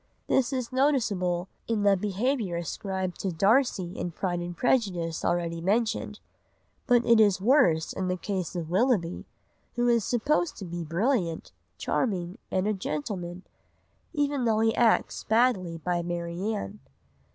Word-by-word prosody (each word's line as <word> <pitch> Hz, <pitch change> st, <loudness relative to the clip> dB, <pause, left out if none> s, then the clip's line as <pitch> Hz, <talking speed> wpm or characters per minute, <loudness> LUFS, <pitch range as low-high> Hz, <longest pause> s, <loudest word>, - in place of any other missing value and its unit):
This 265 Hz, -1 st, +2 dB
is 255 Hz, -3 st, -3 dB
noticeable 205 Hz, -10 st, +1 dB, 0.2 s
in 220 Hz, -3 st, 0 dB
the 200 Hz, -1 st, +5 dB
behaviour 210 Hz, +1 st, -1 dB
ascribed 185 Hz, +2 st, -3 dB
to 190 Hz, -, -2 dB
Darcy 195 Hz, 0 st, +2 dB
in 180 Hz, -, -3 dB
Pride 175 Hz, +1 st, -2 dB
and 175 Hz, 0 st, -6 dB
Prejudice 180 Hz, -10 st, 0 dB
already 170 Hz, -1 st, -1 dB
mentioned, 220 Hz, +5 st, 0 dB, 0.7 s
but 240 Hz, -1 st, +4 dB
it 230 Hz, -1 st, +5 dB
is 205 Hz, -4 st, +4 dB
worse 190 Hz, -, +3 dB
in 190 Hz, -1 st, -2 dB
the 185 Hz, 0 st, -1 dB
case 185 Hz, -2 st, -3 dB
of 165 Hz, -2 st, -4 dB
Willoughby, 190 Hz, -4 st, +1 dB, 0.5 s
who 240 Hz, 0 st, +1 dB
is 235 Hz, -2 st, +3 dB
supposed 295 Hz, -, 0 dB
to 195 Hz, -, -6 dB
be 175 Hz, 0 st, -5 dB
brilliant, 175 Hz, -, -1 dB, 0.3 s
charming, 185 Hz, -6 st, -1 dB
and 185 Hz, +2 st, 0 dB
a 215 Hz, -, +2 dB
gentleman, 175 Hz, +1 st, -4 dB, 0.7 s
even 285 Hz, -3 st, 0 dB
though 220 Hz, -1 st, +2 dB
he 225 Hz, 0 st, +3 dB
acts 235 Hz, -2 st, +2 dB
badly 220 Hz, -7 st, +2 dB
by 175 Hz, +1 st, -1 dB
Marianne. 175 Hz, +5 st, -3 dB
195 Hz, 140 wpm, -27 LUFS, 175-235 Hz, 0.7 s, the